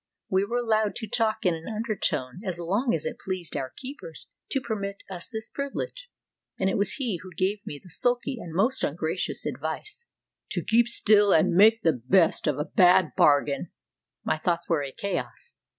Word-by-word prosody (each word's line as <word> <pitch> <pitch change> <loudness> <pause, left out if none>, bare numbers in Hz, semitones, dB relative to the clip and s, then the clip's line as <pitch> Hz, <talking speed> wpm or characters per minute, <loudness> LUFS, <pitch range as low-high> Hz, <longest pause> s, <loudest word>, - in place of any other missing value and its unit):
We 190 +1 +2
were 235 +4 -2
allowed 220 -3 +1
to 220 - -5
talk 220 0 0
in 180 - +4
an 165 0 -7
undertone 195 - -2
as 185 -4 -3
long 200 +9 0
as 160 - -5
it - - -4
pleased 185 -4 -4
our 130 -1 -3
keepers 290 - -9 0.2
to 270 - 0
permit 200 -5 -5
us 175 -2 -6
this 220 -2 -5
privilege, 485 - -5 0.5
and 190 0 +1
it - - -1
was 200 -1 +1
he 235 - -2
who 185 - -10
gave 200 +2 0
me 145 - -5
the 180 - -13
sulky 245 +5 +1
and 170 - -8
most 220 +11 +1
ungracious 160 +4 -2
advice, 160 - -5 0.4
"to - - -2
keep 235 +1 +3
still 210 -3 +5
and 160 - +4
make 220 +5 +5
the 165 - +4
best 160 +10 +2
of 150 - +1
a 150 - -2
bad 180 +1 +4
bargain." 145 -1 +3 0.5
My - - -1
thoughts 170 +1 -1
were 165 -4 +1
a 140 -1 -4
chaos. 200 - -5
195 Hz, 185 wpm, -26 LUFS, 165-230 Hz, 0.5 s, still